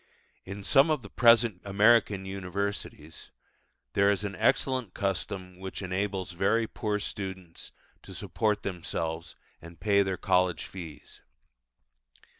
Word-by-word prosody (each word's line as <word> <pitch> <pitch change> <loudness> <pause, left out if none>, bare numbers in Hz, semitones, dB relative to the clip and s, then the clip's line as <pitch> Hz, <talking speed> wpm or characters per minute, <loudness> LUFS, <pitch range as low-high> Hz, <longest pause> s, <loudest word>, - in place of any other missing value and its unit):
In 100 +1 -7
some 135 +9 +5
of 150 -5 0
the 100 - -11
present 115 -5 +5
American 100 -1 +3
universities 95 -4 -5 0.6
there 100 0 +4
is 100 0 -1
an 100 -1 -4
excellent 130 -7 +1
custom 95 -1 -3
which 95 +1 -6
enables 95 0 -2
very 100 +6 +2
poor 105 -2 -2
students 95 -4 -7 0.3
to - - -11
support 105 -1 -1
themselves 85 -3 -4 0.3
and 85 0 -12
pay 100 -1 +3
their 95 -1 -1
college 90 -2 +1
fees. 85 -6 -10
100 Hz, 120 wpm, -29 LUFS, 90-105 Hz, 0.6 s, some